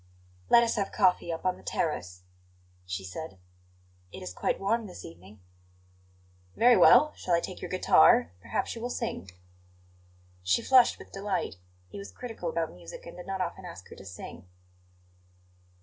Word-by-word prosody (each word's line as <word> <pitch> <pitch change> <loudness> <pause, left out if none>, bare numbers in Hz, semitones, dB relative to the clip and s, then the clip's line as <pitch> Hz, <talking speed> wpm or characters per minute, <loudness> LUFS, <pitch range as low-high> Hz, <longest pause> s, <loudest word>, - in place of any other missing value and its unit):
"Let 235 - +7
us 230 0 0
have 200 -1 -1
coffee 185 -4 +2
up 165 - -5
on 185 -1 +1
the - - -17
terrace," 90 - -3 0.6
she 90 +1 -4
said; 95 - -7 0.7
"it - - -9
is 90 0 -6
quite - - -1
warm 220 +3 0
this 180 - -10
evening." 95 +5 -14 1.1
"Very 245 +1 +6
well. 300 +6 +7
Shall 175 - 0
I - - +3
take - - -7
your - - -5
guitar? 85 - +5
Perhaps - - -2
you 230 - -8
will 245 - -3
sing." 95 - -4 1.1
She 90 +1 +1
flushed 255 -2 +5
with - - -14
delight; 195 - -3 0.3
he 200 - -9
was 200 - -9
critical 250 - -6
about 485 - -2
music - - -11
and - - -10
did 180 - -10
not 190 -1 -3
often 180 +1 -4
ask 170 - -10
her - - -11
to 95 - -12
sing. 90 0 -10
180 Hz, 165 wpm, -29 LUFS, -, 1.1 s, Let